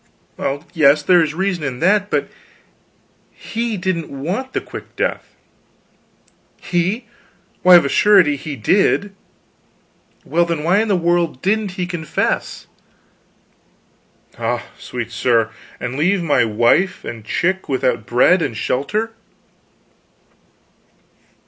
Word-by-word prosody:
"Well 140 Hz, +2 st, -3 dB
yes, 150 Hz, -3 st, +4 dB
there 180 Hz, +2 st, +5 dB
is 155 Hz, -1 st, -1 dB
reason 185 Hz, -2 st, -1 dB
in 130 Hz, -3 st, -4 dB
that. 205 Hz, +3 st, +2 dB
But -, -, 0 dB, 1.0 s
he 230 Hz, -1 st, -4 dB
didn't 180 Hz, -3 st, -2 dB
want 180 Hz, -, -4 dB
the -, -, 0 dB
quick -, -, -10 dB
death." -, -, -3 dB, 1.2 s
"He? 190 Hz, +7 st, -1 dB, 0.6 s
Why, 180 Hz, 0 st, +8 dB
of 170 Hz, -, +6 dB
a -, -, +1 dB
surety 190 Hz, -7 st, +4 dB
he 145 Hz, +1 st, -6 dB
did." 195 Hz, -, +1 dB, 1.1 s
"Well, 170 Hz, +3 st, +2 dB
then, 165 Hz, -3 st, -3 dB
why 180 Hz, +5 st, +3 dB
in 220 Hz, -, 0 dB
the 200 Hz, -, +2 dB
world 170 Hz, -4 st, 0 dB
didn't 205 Hz, -1 st, 0 dB
he 180 Hz, -1 st, -3 dB
confess?" 170 Hz, -4 st, -2 dB, 1.7 s
"Ah, -, -, -2 dB
sweet 120 Hz, -1 st, -6 dB
sir, 115 Hz, 0 st, +1 dB, 0.3 s
and 125 Hz, -, -4 dB
leave 180 Hz, +3 st, +2 dB
my 145 Hz, -7 st, +3 dB
wife 120 Hz, -, +1 dB
and 115 Hz, -2 st, -7 dB
chick 190 Hz, -, -1 dB
without 125 Hz, -4 st, 0 dB
bread 125 Hz, +9 st, +4 dB
and 115 Hz, -, -2 dB
shelter?" 210 Hz, -, -1 dB
170 Hz, 120 wpm, -19 LUFS, 140-190 Hz, 1.7 s, Why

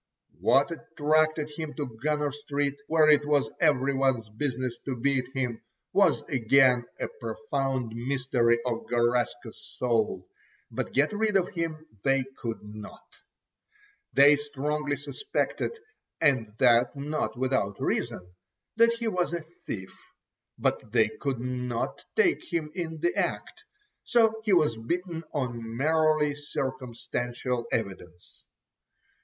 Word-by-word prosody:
What 140 Hz, +5 st, +4 dB
attracted 155 Hz, -1 st, +1 dB
him 155 Hz, 0 st, -6 dB
to 135 Hz, -7 st, -5 dB
Gunner 150 Hz, 0 st, 0 dB
Street, 145 Hz, -1 st, -2 dB
where 160 Hz, -1 st, +4 dB
it 150 Hz, -1 st, +6 dB
was 145 Hz, -6 st, +1 dB
every 140 Hz, -1 st, +3 dB
one's 135 Hz, -4 st, +1 dB
business 125 Hz, +1 st, -2 dB
to 135 Hz, -, -2 dB
beat 130 Hz, 0 st, 0 dB
him, 125 Hz, -4 st, -2 dB, 0.3 s
was -, -, +4 dB
again 125 Hz, 0 st, +4 dB
a -, -, -1 dB
profound 135 Hz, -, -2 dB
mystery 125 Hz, -1 st, +1 dB
of 120 Hz, -2 st, -2 dB
Garaska's 120 Hz, -1 st, 0 dB, 0.2 s
soul, 110 Hz, -7 st, 0 dB, 0.4 s
but -, -, -3 dB
get 145 Hz, +8 st, +2 dB
rid 210 Hz, -1 st, +2 dB
of 185 Hz, -1 st, 0 dB
him 165 Hz, -2 st, -4 dB, 0.2 s
they 135 Hz, -1 st, +3 dB
could 115 Hz, -3 st, -5 dB
not. 105 Hz, 0 st, -11 dB, 0.9 s
They 145 Hz, +1 st, +7 dB
strongly 145 Hz, 0 st, -2 dB
suspected, 415 Hz, -, -2 dB, 0.4 s
and 130 Hz, -9 st, +2 dB
that 120 Hz, 0 st, +4 dB
not 145 Hz, -1 st, -2 dB
without 130 Hz, -6 st, 0 dB
reason, 90 Hz, -, -2 dB, 0.5 s
that 230 Hz, 0 st, +6 dB
he 235 Hz, 0 st, -3 dB
was 180 Hz, -5 st, 0 dB
a 170 Hz, -, -2 dB, 0.3 s
thief, 95 Hz, -3 st, -5 dB, 0.6 s
but 110 Hz, -, -1 dB
they 110 Hz, -2 st, +4 dB
could 135 Hz, +2 st, -3 dB
not 125 Hz, -1 st, -3 dB
take -, -, +2 dB
him 160 Hz, -3 st, -1 dB
in 160 Hz, -3 st, -4 dB
the 175 Hz, 0 st, +1 dB
act, -, -, -2 dB, 0.4 s
so 225 Hz, -2 st, +3 dB
he 210 Hz, -, +3 dB
was 150 Hz, -10 st, +3 dB
beaten 170 Hz, +7 st, -3 dB
on 120 Hz, -5 st, -3 dB
merely 155 Hz, 0 st, +3 dB
circumstantial 125 Hz, -3 st, -3 dB
evidence. 95 Hz, -5 st, -5 dB
135 Hz, 125 wpm, -28 LUFS, 120-155 Hz, 0.9 s, They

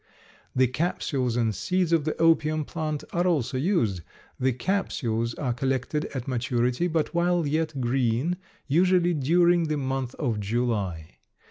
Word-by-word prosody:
The 130 Hz, 0 st, +5 dB
capsules 130 Hz, -3 st, -1 dB
and 115 Hz, -2 st, +1 dB
seeds 180 Hz, -, 0 dB
of 160 Hz, -3 st, +2 dB
the 155 Hz, -, -2 dB
opium 155 Hz, -2 st, +3 dB
plant 155 Hz, -2 st, -3 dB
are 175 Hz, +1 st, +1 dB
also 140 Hz, -7 st, 0 dB
used. 130 Hz, -, +1 dB, 0.4 s
The 130 Hz, +1 st, +2 dB
capsules 120 Hz, -, -1 dB
are 130 Hz, -5 st, -1 dB
collected 135 Hz, +4 st, -1 dB
at 130 Hz, -2 st, -6 dB
maturity, 125 Hz, +4 st, 0 dB
but 160 Hz, -1 st, -1 dB
while 175 Hz, -1 st, +2 dB
yet 155 Hz, -1 st, -1 dB
green, 125 Hz, +6 st, 0 dB, 0.3 s
usually 175 Hz, +3 st, +3 dB
during 170 Hz, +4 st, +3 dB
the 155 Hz, -1 st, -1 dB
month 135 Hz, -2 st, -2 dB
of 120 Hz, -8 st, -1 dB
July. 100 Hz, -7 st, -2 dB
140 Hz, 140 wpm, -26 LUFS, 120-165 Hz, 0.4 s, The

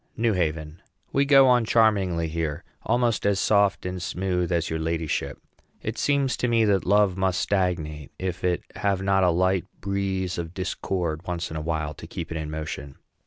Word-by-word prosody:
NEW 115 Hz, -1 st, +2 dB
HAVEN. 80 Hz, -2 st, -2 dB, 0.3 s
We 140 Hz, +1 st, +3 dB
go 135 Hz, -1 st, +7 dB
on 125 Hz, -2 st, +5 dB
charmingly 100 Hz, -7 st, +2 dB
here, 80 Hz, 0 st, -3 dB, 0.2 s
almost 120 Hz, -2 st, +1 dB
as 100 Hz, -1 st, +2 dB
soft 100 Hz, -3 st, +2 dB
and 90 Hz, 0 st, -4 dB
smooth 90 Hz, 0 st, -1 dB
as 85 Hz, -1 st, +1 dB
your 80 Hz, -, -2 dB
ladyship. 80 Hz, -4 st, -2 dB, 0.5 s
It -, -, -3 dB
seems 140 Hz, -2 st, +1 dB
to 125 Hz, -, 0 dB
me 115 Hz, -2 st, +3 dB
that 100 Hz, -4 st, +1 dB
love 100 Hz, -1 st, +3 dB
must 95 Hz, -2 st, +1 dB
stagnate 85 Hz, -7 st, -1 dB
if 90 Hz, -1 st, -4 dB
it 90 Hz, -1 st, +1 dB
have 100 Hz, -2 st, 0 dB
not 95 Hz, -1 st, +3 dB
a 90 Hz, -, +5 dB
light 95 Hz, +2 st, +2 dB
breeze 95 Hz, -2 st, -2 dB
of 85 Hz, +1 st, -6 dB
discord 90 Hz, -3 st, -3 dB
once 90 Hz, -1 st, -3 dB
in -, -, -5 dB
a 80 Hz, -, -3 dB
while 75 Hz, -1 st, -2 dB
to -, -, -11 dB
keep 85 Hz, -1 st, -6 dB
it 80 Hz, -, -3 dB
in 80 Hz, -1 st, -4 dB
motion. 75 Hz, -3 st, -6 dB
90 Hz, 185 wpm, -25 LUFS, 80-100 Hz, 0.5 s, go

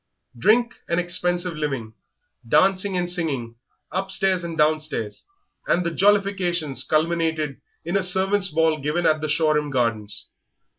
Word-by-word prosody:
Drink 230 Hz, -, +2 dB
and 170 Hz, -, +1 dB
expensive 175 Hz, 0 st, 0 dB
living, 135 Hz, -8 st, -4 dB, 0.5 s
dancing 190 Hz, -, +2 dB
and 175 Hz, 0 st, -1 dB
singing 140 Hz, -10 st, -3 dB, 0.3 s
upstairs 190 Hz, -1 st, +1 dB
and 165 Hz, -1 st, -6 dB
downstairs, 155 Hz, -8 st, -1 dB, 0.4 s
and 180 Hz, 0 st, +1 dB
the 170 Hz, -, -1 dB
jollifications 190 Hz, -6 st, +1 dB
culminated 160 Hz, -2 st, -1 dB, 0.2 s
in 170 Hz, +3 st, -3 dB
a 195 Hz, -, +2 dB
servants' 190 Hz, +2 st, +3 dB
ball 160 Hz, -1 st, +1 dB
given 150 Hz, +5 st, -2 dB
at 155 Hz, 0 st, +2 dB
the 155 Hz, -, -3 dB
Shoreham 150 Hz, -1 st, +1 dB
Gardens. 110 Hz, -6 st, -2 dB
165 Hz, 130 wpm, -23 LUFS, 150-185 Hz, 0.5 s, servants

